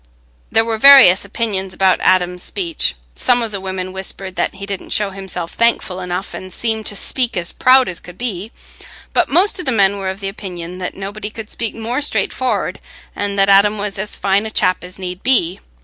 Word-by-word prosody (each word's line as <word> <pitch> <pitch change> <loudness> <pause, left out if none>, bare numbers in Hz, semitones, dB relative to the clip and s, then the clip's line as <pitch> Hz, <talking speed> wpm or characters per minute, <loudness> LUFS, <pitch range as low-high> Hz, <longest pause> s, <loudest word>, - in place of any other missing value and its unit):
There 225 0 +4
were 225 -1 -2
various 270 -9 +8
opinions 200 -2 -3
about 190 -1 +3
Adam's 180 -1 +2
speech: 340 - -2 0.2
some 245 -1 +2
of 225 - -4
the 200 -2 -5
women 185 -1 -5
whispered 190 0 -6
that - - -1
he 200 +1 -7
didn't 200 -2 -6
show 205 -2 0
himself 190 -3 -4
thankful 230 -5 +1
enough, 180 +1 -4
and 185 0 -8
seemed 220 +2 -2
to 205 - -2
speak 245 +2 0
as 170 -1 +2
proud 255 0 +4
as 175 -2 -4
could 180 +1 -13
be; 215 -3 -4 0.6
but - - +2
most 370 +6 +3
of 360 - -6
the - - +3
men 200 -3 +2
were 190 -1 -3
of 190 +2 -7
opinion 180 -3 -6
that 180 - -5
nobody 205 +2 -6
could 220 0 -9
speak 230 -2 -3
more 230 +4 -3
straightfor'ard, 260 -3 -1 0.4
and 205 0 -3
that 195 0 +4
Adam 200 +2 +5
was 200 -1 -4
as 210 +2 -2
fine 200 +2 +1
a - - -5
chap 185 -4 +1
as 180 +1 -9
need 180 -1 -5
to - - -35
be. 200 -8 +2
200 Hz, 205 wpm, -17 LUFS, 185-225 Hz, 0.6 s, various